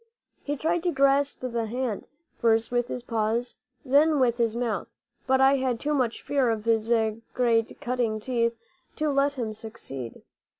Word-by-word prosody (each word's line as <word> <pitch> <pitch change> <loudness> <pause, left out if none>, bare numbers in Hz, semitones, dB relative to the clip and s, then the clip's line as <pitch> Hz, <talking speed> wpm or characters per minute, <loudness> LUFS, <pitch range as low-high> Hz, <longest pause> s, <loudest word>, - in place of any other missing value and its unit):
He 290 0 -3
tried 330 +4 0
to 350 0 0
grasp 275 0 +2
the 235 -3 -2
hand, 240 -2 -3 0.3
first 225 -1 +2
with 245 0 +1
his 250 -1 -5
paws, 230 +1 -1 0.3
then 290 +3 +4
with 240 -2 +2
his 230 -1 +1
mouth; 235 -2 -2 0.4
but 265 0 +3
I 270 +1 +5
had 255 -3 -1
too 300 +1 -1
much 250 -5 0
fear 275 -4 +1
of 220 -1 -2
his 225 0 +1 0.4
great 230 -3 +1
cutting 240 -3 -1
teeth 235 0 0 0.4
to 305 -1 0
let 280 +1 +2
him 235 -5 -3
succeed. 135 - -8
245 Hz, 165 wpm, -26 LUFS, 225-275 Hz, 0.4 s, I